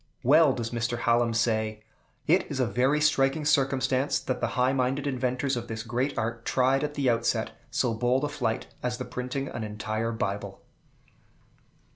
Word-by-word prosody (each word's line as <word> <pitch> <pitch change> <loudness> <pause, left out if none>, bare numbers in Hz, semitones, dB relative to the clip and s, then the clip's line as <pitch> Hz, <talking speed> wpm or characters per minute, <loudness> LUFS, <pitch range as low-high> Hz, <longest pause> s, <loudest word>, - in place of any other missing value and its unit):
Well 145 +2 +6
does 115 -3 -4
Mr. 120 0 -1
Hallam 120 0 +3
say, 110 -2 0 0.4
"It 175 +4 +2
is 140 -3 -3
a 130 - +3
very 125 +7 +2
striking 150 0 +2
circumstance, 135 -1 +2
that 130 -1 -3
the - - +1
high 125 +1 +3
minded 135 +2 0
inventors 130 0 -1
of 120 -1 -4
this 110 -1 -5
great 125 +5 -2
art 115 +1 -2
tried 130 +3 +2
at 150 0 -3
the 140 -2 0
outset 115 -1 +1 0.2
so 120 - 0
bold 125 +4 +1
a 145 - 0
flight 115 -6 -2 0.2
as 125 0 -2
the 125 - -5
printing 125 +2 -4
an 115 - -5
entire 110 +1 -3
Bible." 100 -3 -4
125 Hz, 170 wpm, -27 LUFS, 115-135 Hz, 0.4 s, Well